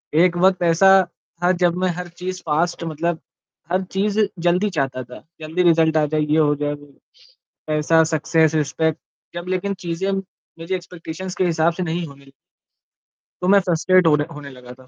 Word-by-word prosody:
एक 175 +2 +4
वक़्त 185 +1 +3
ऐसा 170 +3 +4 0.5
था 180 - +4
जब 175 -1 +3
मैं 185 0 0
हर 180 0 -6
चीज़ 180 +2 -6
फास्ट 170 +3 0
मतलब 165 +1 -2 0.5
हर 185 +1 +2
चीज़ 205 +2 0 0.2
जल्दी 180 +4 +1
चाहता 135 -7 -2
था। 125 +1 -12 0.2
जल्दी 160 +4 -1
रिजल्ट 160 -2 +3
आ 155 - +3
जाए 155 +1 -1
ये 150 +1 +1
हो 150 -2 +3
जाए 145 0 -2
वो 145 0 -11 0.8
पैसा, 155 +1 +3
सक्सेस, 160 0 +1
रिस्पेक्ट 160 +1 0 0.4
जब 175 +1 -6
लेकिन 185 +2 -1
चीज़ें 175 +3 -2
मुझे 190 -2 -6
एक्सपेक्टेशंस 180 0 -7
के 185 - +1
हिसाब 165 -1 +2
से 185 - -3
नहीं 170 0 -2
होने 140 -1 -15 1.1
तो 180 - -1
मैं 200 +1 +6
फ्रस्ट्रेट 185 0 +2
होने 150 -2 +3
होने 145 -1 -9
लगा 125 -2 -12
था 130 - -17
165 Hz, 175 wpm, -21 LUFS, 155-180 Hz, 1.1 s, मैं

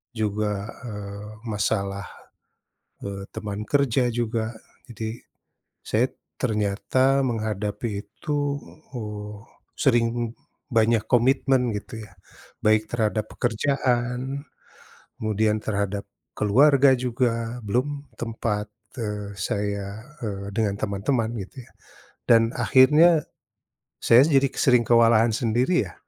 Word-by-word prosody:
juga, 105 -1 -1 0.2
eee, 100 0 -7 0.2
masalah, 100 -2 -1 1.0
eee, 100 -1 -5
teman 105 -1 -5
kerja 135 -1 +2
juga 115 -1 -1 0.4
jadi, 115 0 -6 0.6
saya - - +2 0.3
ternyata 110 +6 +1
menghadapi 110 -2 -2 0.2
itu, 150 -1 -4 0.6
uh, 105 -2 -6 0.4
sering 120 -3 +1 0.4
banyak 115 -1 +3
komitmen 130 0 +3
gitu 110 +2 -7
ya, - - -16 0.5
baik 110 0 +4
terhadap 110 -2 0
pekerjaan, 125 +2 -1 0.7
kemudian 110 0 +1
terhadap 100 -1 -2 0.3
keluarga 135 +6 +5
juga 120 -1 -1
belum 140 +7 -1
tempat, 110 -2 -2 0.3
eee, 105 -3 -4
saya, 100 +1 -2 0.4
eee, 100 -3 -4
dengan 105 -3 +1
teman-teman 110 +4 0
gitu 125 +6 -12
ya, - - -22 0.6
dan 115 -1 +6
akhirnya, 150 +5 +5 0.8
saya 120 +2 +7
jadi 140 -3 +4
ke - - -15
sering 125 -3 +4
kewalahan 115 -1 +5
sendiri 120 +10 +1
ya, - - -14
115 Hz, 100 wpm, -24 LUFS, 105-125 Hz, 1.0 s, saya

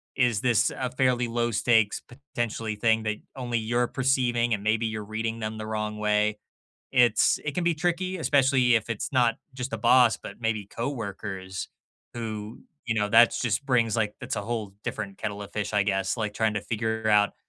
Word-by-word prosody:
is 120 -5 +2
this 120 -4 +3
a 130 -1 -3
fairly 125 -2 +1
low 120 0 0
stakes, 110 -1 +2
potentially, 120 -4 -4
thing 110 +1 +2
that 110 -1 -1 0.2
only 120 -2 -2
you're 120 +2 0
perceiving 125 -3 +1
and 100 - -1
maybe 110 +2 +1
you're 110 -1 -4
reading 110 +2 -3
them 110 0 -4
the 110 - -5
wrong 105 -1 -3
way? 105 0 +1 0.5
It's 120 -4 +4
It 150 - -2
can 180 - 0
be 170 -1 +2
tricky. 175 +3 -1
Especially 130 -6 +3
if 110 0 -1
it's 115 +3 -3
not 120 -3 +3 0.2
just 130 0 -4
the - - -2
boss, 120 -1 +5
but - - -10
maybe 110 -3 -1
coworkers 100 -6 -5 0.4
who, 110 -1 -6 0.2
you 115 - -1
know, 105 -2 +1
that's 120 +2 +6
just 120 +2 0
brings 120 -5 +2
like 105 -2 -1
that's - - -4
a 105 - -2
whole 110 -2 -4
different 100 -1 -5
kettle 105 -1 -4
of 100 - -11
fish, 105 -1 -2
I 105 -1 +3
guess, 95 +1 0
like, 105 -2 -2
trying 110 0 0
to 105 - -1
figure 110 0 -2
out 105 -1 +4
115 Hz, 190 wpm, -26 LUFS, 105-125 Hz, 0.5 s, that's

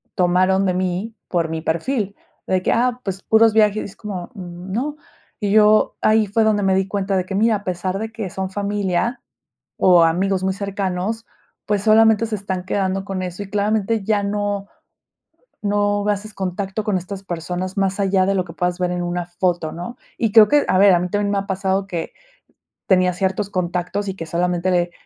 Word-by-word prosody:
tomaron 185 +2 +3
de 185 - +1
mí 185 +4 -2
por 170 -3 0
mi 160 0 -3
perfil, 200 - -1 0.3
de 185 -1 +1
que, - - +1
ah, 245 +1 +1
pues 195 -1 -4
puros 220 +1 +4
viajes, 215 -1 +3
es - - -18
como, 195 -4 -6
no, 190 +9 -5 0.4
y 205 -2 -1
yo 215 0 +5
ahí 215 0 +4
fue 210 +3 +1
donde 215 -2 +2
me 190 0 +3
di 190 0 +1
cuenta 195 -1 -1
de 185 -1 0
que, 195 - -4
mira, 220 +2 +3
a 205 - -13
pesar 185 +1 -2
de 220 +1 -4
que 225 -3 -5
son 190 +1 -3
familia 200 +2 -1 0.6
o 180 -2 +6
amigos 185 +3 +1
muy 190 0 +1
cercanos, 200 +2 -3 0.4
pues, 205 -1 0
solamente 220 0 +5
se 220 -1 -3
están 190 -2 -4
quedando 190 0 -1
con 195 -2 -3
eso 185 +2 -5
y 200 - -12
claramente 210 +2 0
ya 210 -1 +1
no 205 0 -2 1.0
no 205 0 +1
haces 210 +1 -2
contacto 195 +2 -3
con 205 -2 0
estas 185 +2 -6
personas 180 +1 -4
más 195 0 0
allá 195 -1 +2
de 195 - +2
lo 185 -2 0
que 165 - -10
puedas 180 +1 -1
ver 180 -1 0
en 180 0 -2
una 175 0 -2
foto, 175 -2 -1
¿no?, 175 +8 -7 0.2
y 225 -2 +1
creo 215 -1 +8
que, 295 0 +4
a - - +2
ver, 200 0 +7
a 175 - +4
mí 180 - -2
también 205 +1 0
me 200 - +1
ha 195 - -5
pasado 190 0 0
que 170 -4 -4 0.7
tenía 185 -2 +3
ciertos 190 +2 -1
contactos 180 +2 -2
y 190 - -4
que 165 - -6
solamente 175 +2 0
le 175 -1 +1
195 Hz, 200 wpm, -20 LUFS, 180-210 Hz, 1.0 s, creo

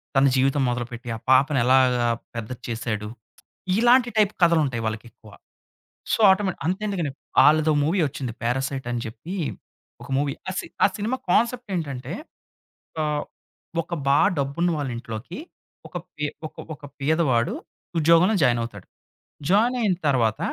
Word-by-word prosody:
తన 135 +1 +5
జీవితం 135 +2 +2
మొదలుపెట్టి, 120 0 -4
ఆ - - -5
పాపని 135 +1 +4
ఎలాగా 125 -2 +4 0.3
పెద్దది 115 +2 -6
చేసాడు. 110 -2 -3 0.7
ఇలాంటి 240 +1 +5
టైప్ 210 -1 +3
కథలు 170 -2 +5
ఉంటాయి 120 -4 -3
వాళ్ళకి 110 +1 -3
ఎక్కువ. 110 -1 -18 0.8
సో, - - +1
ఆటోమేటిక్ 190 -3 +1
అంతెందుకండి 190 -5 -1 0.3
ఆళ్ళదో 155 +1 +5
మూవీ 175 +6 +1
వచ్చింది 130 -4 -5
'పారాసైట్' 130 +1 -1
అని 120 -1 -2
చెప్పి 130 - -7 0.7
ఒక - - -11
మూవీ 140 -1 0 0.2
ఆ - - -2
సి - - -6 0.3
సినిమా 225 +6 -1
కాన్సెప్ట్ 240 +1 +1
ఏంటంటే, 140 -3 -4 0.9
ఒక - - +1 0.8
ఒక 170 - -8 0.2
బాగా 145 +8 +5
డబ్బున్న 140 +6 0
వాళ్ళ 140 -3 -2
ఇంట్లోకి, 115 - -7 0.5
ఒక 175 - -6 0.2
పే 150 -1 -2 0.2
ఒక - - -21 0.2
ఒక 150 - -27 0.2
పేదవాడు 135 -5 +1 0.5
ఉద్యోగంలో 170 +6 +5
జాయిన్ 120 -2 +3
అవుతాడు. 105 -4 -9 0.6
జాయిన్ 230 +6 +4
అయిన 195 -5 +2
తర్వాత 115 -6 +2
140 Hz, 135 wpm, -24 LUFS, 120-175 Hz, 0.9 s, తన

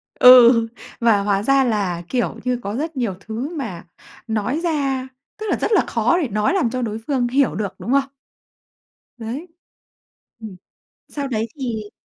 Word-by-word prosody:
Ừ, 240 -2 +8 0.3
và 225 -4 +3
hóa 200 0 0
ra 275 +2 +4
là, 200 -8 -1
kiểu 245 -2 -1
như, 250 -1 -1
có 200 +2 -4
rất 310 +3 -4
nhiều 235 -6 -1
thứ 225 +7 -5
mà 220 - -6 0.4
nói 225 +6 -1
ra, 275 -6 -1 0.3
tức 430 - -5
là, - - +1
rất - - 0
là 420 - +5
khó 235 +9 +1
để 295 - -1
nói 215 - 0
làm 345 -12 +1
cho 255 +1 -3
đối 220 -2 -3
phương 260 -4 +1
hiểu 265 +2 +1
được, 205 -3 -3
đúng 240 - -4
không? 275 0 +2 1.1
Đấy. 240 +9 -6 0.9
Ừm, 215 -4 -9 0.5
sau 280 -2 -4
đấy 225 -2 -1
thì 220 -6 -4
240 Hz, 170 wpm, -20 LUFS, 215-275 Hz, 1.1 s, Ừ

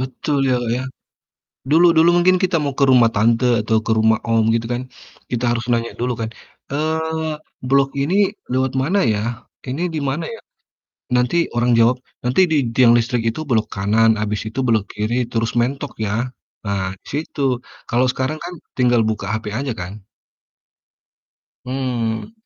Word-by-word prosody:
betul, 130 +3 -2
ya, 125 - +3
Kak, 120 - -3
ya, 130 - -3 0.9
dulu 165 +4 +5
dulu 165 +2 +6
mungkin 185 +1 +4
kita 180 -2 +2
mau 140 -1 -2
ke 140 - +1
rumah 125 -2 +6
tante 115 +4 +2 0.2
atau 110 +1 +2
ke - - 0
rumah 110 0 +3
om, 115 -1 +3
gitu 115 0 -1
kan, 120 - -2 0.5
kita 125 0 -1
harus 115 - -3
nanya 115 0 0
dulu 125 +1 0
kan, 110 - -2 0.4
eee, 160 +1 -1 0.3
"Blok 135 0 +4
ini 190 +9 +2 0.2
lewat 130 0 0
mana, 175 +9 +1
ya? 115 +2 -1 0.2
Ini 140 +7 -2
di 155 - -1
mana 155 +5 -2
ya?" 230 - -7 0.7
Nanti 125 +4 +2 0.2
orang 120 +1 +2
jawab, 120 +2 +4 0.3
"Nanti 125 +8 +3
di 155 - +3 0.2
tiang 120 -1 +6
listrik 120 +1 0
itu 115 - -5
belok 110 -3 +2
kanan, 110 +3 +3
habis 105 -1 -2
itu 120 - -6
belok 110 -4 +2
kiri, 115 +3 -1
terus 115 0 0
mentok, 135 +4 -1
ya. 110 +3 0 0.4
Nah, 95 -2 -2 0.2
situ," 140 -3 -1 0.3
kalau 125 +2 +2
sekarang 130 +5 -2
kan 175 +1 -6 0.2
tinggal 120 -2 +3
buka 110 -2 -2
HP 110 -1 -5
aja 135 -3 -2
kan? 95 +3 -7 1.6
Mmm. 125 - -2
125 Hz, 165 wpm, -20 LUFS, 115-140 Hz, 1.6 s, dulu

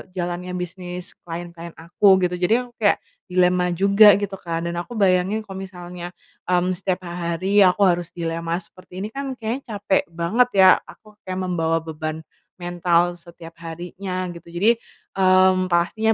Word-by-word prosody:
jalannya 180 0 -3
bisnis 180 +1 -6 0.2
klien-klien 170 0 -7
aku, 190 +4 +3
gitu. 180 0 -1
Jadi 225 +8 +2
aku 245 - -14
kayak 205 -2 +4 0.3
dilema 180 -1 +2
juga 200 +3 +7
gitu 200 -1 -4
kan 165 -2 -4
dan 170 0 -4
aku 175 +8 -5
bayangin 195 0 +2
kalo 195 -3 -9
misalnya, 175 -1 -9 0.3
mmm, 180 0 +2
setiap 185 -1 -2
ha 170 -1 -3
hari 195 +4 +1
aku 185 +3 +2
harus 175 -3 +2
dilema 165 +1 -3
seperti 185 +2 -12
ini 210 - -3
kan 275 +2 -5
kayaknya 235 +1 -5
capek 200 -1 +1
banget 195 +10 +1
ya. 185 - +9 0.2
Aku 210 -1 -17
kayak 185 0 -4
membawa 165 -3 0
beban 160 0 -5 0.4
mental 175 0 +1
setiap 170 -1 -14
harinya 180 +2 -5
gitu 170 -1 -12
jadi, 205 +7 +4 0.5
mmm, 185 0 +4
pastinya 215 +6 +2
180 Hz, 155 wpm, -22 LUFS, 170-195 Hz, 0.5 s, ya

